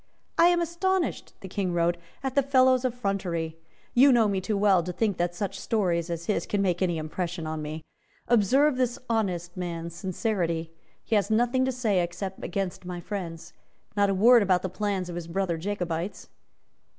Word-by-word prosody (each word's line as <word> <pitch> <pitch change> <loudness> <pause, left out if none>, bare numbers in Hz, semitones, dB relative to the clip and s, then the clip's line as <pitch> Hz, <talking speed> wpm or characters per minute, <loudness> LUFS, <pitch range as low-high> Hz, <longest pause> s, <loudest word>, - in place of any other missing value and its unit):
"I 335 - +6
am 350 0 +3
astonished," 345 +2 -1
the 190 - -7
King 185 -1 -2
wrote, 170 0 +2 0.3
"at 265 -1 -2
the 280 - +4
fellow's 260 -1 +4
effrontery. 195 -9 -2 0.3
You 270 +3 +7
know 235 -3 +5
me 195 -2 0
too 210 +2 -1
well 195 -3 +4
to 180 +2 -4
think 205 +1 0
that 175 0 -1
such 195 +1 -3
stories 175 -7 0
as 170 0 -4
his 210 - -1
can 205 - 0
make 185 -2 +1
any 175 -3 +1
impression 165 +2 -4
on 155 0 -3
me. 155 +1 -5 0.4
Observe 255 +6 +4
this 250 -2 0
honest 180 -6 -1
man's 170 -2 -4
sincerity. 170 -3 -2 0.3
He - - -4
has 205 0 +2
nothing 245 +4 +2
to 260 - 0
say 220 -7 +1
except 180 +3 -5
against 190 +1 -3
my 180 -1 -5
friends. 170 -3 -6 0.4
Not 200 -1 +3
a 195 - +1
word 235 +5 +7
about 185 -3 +2
the 185 - -2
plans 195 -1 -2
of 175 - -6
his 170 -1 -5
brother 175 0 -1
Jacobites." 180 -1 -3
190 Hz, 185 wpm, -27 LUFS, 175-225 Hz, 0.4 s, You